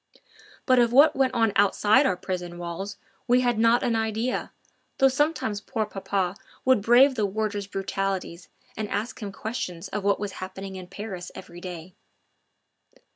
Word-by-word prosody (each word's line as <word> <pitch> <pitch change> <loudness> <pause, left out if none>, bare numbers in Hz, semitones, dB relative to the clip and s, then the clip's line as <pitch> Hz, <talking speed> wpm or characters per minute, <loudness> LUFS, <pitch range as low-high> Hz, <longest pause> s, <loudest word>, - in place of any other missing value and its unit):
But 255 -2 +5
of 235 -1 +4
what 280 +5 +6
went 265 -1 +1
on 225 -3 +2
outside 210 +6 +4
our 185 - 0
prison 180 -2 -5
walls 175 +4 -5 0.3
we 245 +1 +4
had 240 -3 +1
not 230 +2 +4
an 235 - +1
idea, 225 +2 -1 0.5
though 270 - +6
sometimes 270 -7 0
poor 220 +1 -2
papa 195 -2 -2 0.3
would 260 -5 +4
brave 245 +6 +6
the 215 -5 0
warder's 205 0 -2
brutalities 195 -3 -3 0.3
and 215 -1 -4
ask 225 +4 -3
him 205 -2 -4
questions 190 -6 -5
of 210 -1 -3
what 200 0 +2
was 205 -1 -3
happening 190 +1 -7
in 185 -1 -8
Paris 190 -2 -7
every 175 0 -10
day. 180 -1 -8
205 Hz, 160 wpm, -26 LUFS, 190-235 Hz, 0.5 s, what